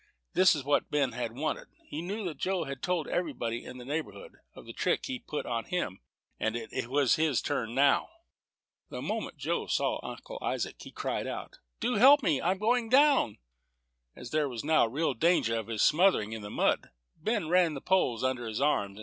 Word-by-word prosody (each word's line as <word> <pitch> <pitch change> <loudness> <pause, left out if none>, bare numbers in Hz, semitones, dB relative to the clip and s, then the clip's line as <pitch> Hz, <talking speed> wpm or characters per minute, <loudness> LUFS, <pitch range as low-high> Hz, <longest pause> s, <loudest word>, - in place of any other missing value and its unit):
This 185 -2 +5
was 145 - -4
just - - -16
what 145 - +2
Ben 145 -4 +1 0.2
wanted. 155 +4 -3 0.2
He 150 - -5
knew 205 +5 -4
that 165 -4 -5
Joe 185 -2 0
had 135 -3 -6
told 180 -4 -1
everybody 120 -9 -2
in 125 - -9
the 125 - -9
neighborhood 160 - -5 0.2
of - - -12
the - - -9
trick - - 0
he 260 -2 -4
put 155 -10 -5
on 115 -2 -2
him, 170 - -3 0.4
and 110 +1 -1
it 115 0 -4
was 135 0 +3
his 155 -5 +2
turn 120 -5 -2
now. 140 +1 +3 0.8
The - - -6
moment - - -3
Joe - - -2
saw - - 0
Uncle - - -8
Isaac, - - -2
he - - -10
cried - - -3
out, - - -6 0.2
"Do 240 0 0
help 275 +5 +7
me; 150 -5 +2
I'm 185 +3 +1
going 225 +3 +1
down." 275 - +4 0.8
As 125 - -9
there 150 -2 +1
was 120 -3 -5
now 155 -4 +4
real 145 +5 0
danger 140 -4 +2
of 110 -2 -3
his 110 -2 0
smothering 155 - +3
in 110 - -5
the 105 - -7
mud, - - +1 0.3
Ben 205 +1 -1
ran 175 -2 +3
the - - -4
poles 135 -10 +1
under 130 -2 -1
his 110 -1 -3
arms. 105 -8 0
150 Hz, 200 wpm, -30 LUFS, 120-185 Hz, 0.8 s, help